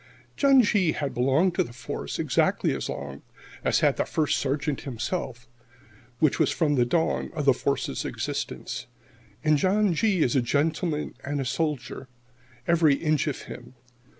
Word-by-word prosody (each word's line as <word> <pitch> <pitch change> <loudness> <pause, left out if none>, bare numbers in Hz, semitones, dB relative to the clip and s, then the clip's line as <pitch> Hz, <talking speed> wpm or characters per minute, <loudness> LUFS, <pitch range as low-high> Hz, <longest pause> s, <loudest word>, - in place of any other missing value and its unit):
John 275 -3 +5
G. 195 -6 +2
had 145 -2 -3
belonged 135 +9 +2
to - - +2
the 120 - -10
Force 120 -1 -5
exactly - - +1
as - - -4
long 70 0 -6 0.4
as - - +2
had - - +3
the - - +2
First 155 -2 0
Sergeant 140 +1 -1
himself, 125 -1 -4 0.7
which 155 -3 +2
was - - +3
from 155 -3 +1
the 125 -3 +2
dawn 160 +5 0
of 150 -3 -2
the 135 - +6
Force's 140 +2 -2
existence. - - -4 0.6
And 155 -1 +3
John 195 +1 +2
G. 190 -1 +2
is 125 - +1
a 130 - +4
gentleman 150 +4 -1
and 145 +1 -2
a 135 - -2
soldier, 145 -2 -3 0.6
every 165 -4 +4
inch 155 -1 0
of 145 - -3
him. 125 +1 -10
150 Hz, 160 wpm, -26 LUFS, 130-165 Hz, 0.7 s, the